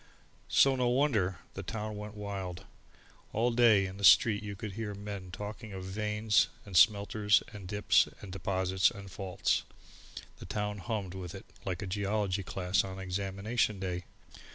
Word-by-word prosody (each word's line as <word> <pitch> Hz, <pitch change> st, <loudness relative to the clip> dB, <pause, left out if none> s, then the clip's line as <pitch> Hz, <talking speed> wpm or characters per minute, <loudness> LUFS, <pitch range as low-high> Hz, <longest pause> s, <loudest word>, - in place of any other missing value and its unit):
So 135 Hz, -1 st, +5 dB
no 125 Hz, -1 st, +1 dB
wonder 120 Hz, -, +2 dB, 0.2 s
the 95 Hz, -, -5 dB
town 105 Hz, +2 st, -4 dB
went 105 Hz, 0 st, -7 dB
wild! 100 Hz, -4 st, -5 dB, 0.7 s
All 120 Hz, +3 st, +2 dB
day 115 Hz, -4 st, +5 dB
in 95 Hz, +1 st, -6 dB
the 100 Hz, -, -8 dB
street 105 Hz, +4 st, +7 dB
you 100 Hz, -1 st, -6 dB
could 105 Hz, +2 st, -6 dB
hear 105 Hz, 0 st, -4 dB
men 100 Hz, -2 st, -7 dB
talking 105 Hz, +3 st, -7 dB
of 95 Hz, -1 st, -6 dB
veins, 105 Hz, +2 st, +2 dB, 0.2 s
and 100 Hz, -3 st, -9 dB
smelters 105 Hz, +2 st, +4 dB
and 100 Hz, -3 st, -8 dB
dips 105 Hz, +2 st, +3 dB
and 100 Hz, -, -9 dB
deposits 95 Hz, 0 st, +1 dB
and 100 Hz, -1 st, -10 dB
faults, 95 Hz, -1 st, 0 dB, 0.8 s
the -, -, -9 dB
town 105 Hz, -1 st, -2 dB
hummed 100 Hz, -3 st, -3 dB
with 90 Hz, -3 st, -7 dB
it -, -, -9 dB, 0.2 s
like 95 Hz, +2 st, -3 dB
a -, -, -3 dB
geology 100 Hz, 0 st, -1 dB
class 90 Hz, 0 st, 0 dB
on 95 Hz, -1 st, -6 dB
examination 100 Hz, +3 st, -1 dB
day. 90 Hz, -1 st, -3 dB
100 Hz, 160 wpm, -31 LUFS, 95-105 Hz, 0.8 s, street